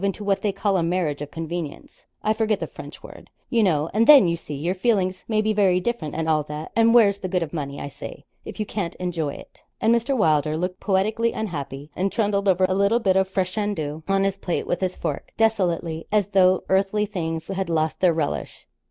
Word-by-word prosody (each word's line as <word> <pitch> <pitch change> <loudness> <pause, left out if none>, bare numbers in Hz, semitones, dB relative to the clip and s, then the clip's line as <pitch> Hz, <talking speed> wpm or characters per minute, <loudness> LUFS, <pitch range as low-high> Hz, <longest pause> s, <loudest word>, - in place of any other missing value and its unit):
into 200 +1 -1
what 195 -1 0
they 210 - +1
call 195 0 0
a - - +1
marriage 165 -4 -1
of 145 - -5
convenience 165 -1 -7 0.2
I 215 - +2
forget 220 -2 0
the - - -2
French - - -11
word - - -12 0.2
you 235 - +3
know; 160 -7 +2
and 225 +3 +3
then, 280 -10 +9
you 170 - +1
see, 150 -3 -7
your 165 +6 -1
feelings 190 -2 0
may 215 -1 +1
be 215 0 +1
very 190 -3 +3
different, 185 -7 -3
and 160 0 -2
all 155 -1 +3
that; 150 +1 -7
and 230 0 +5
where's 200 -4 +5
the 185 - -4
good 180 -1 0
of 155 - -8
money, 140 -3 -4
I - - -5
say, 140 0 -9 0.2
if - - -9
you 215 - -1
can't 195 -4 -4
enjoy 165 -5 -3
it?' - - -14 0.2
And 225 - +3
Mr. 240 +4 +1
Wylder 155 -5 +2
looked 180 +2 -3
poetically 215 +4 +1
unhappy, 145 -7 -5
and 190 +2 0
trundled 205 -2 0
over 185 -1 +4
a 185 - 0
little 200 +4 +3
bit 190 -5 +2
of 190 0 +2
fricandeau 185 -5 -2
on 195 0 +2
his 195 0 0
plate 180 -3 -2
with 175 - -2
his 185 -1 -1
fork, - - -5
desolately, 175 -7 0
as 205 -2 +2
though 185 -2 +4
earthly 195 +2 +2
things 165 -6 -4
had 190 -2 -2
lost 160 -1 0
their 180 -2 +4
relish. 150 -3 -3
185 Hz, 220 wpm, -23 LUFS, 165-205 Hz, 0.2 s, then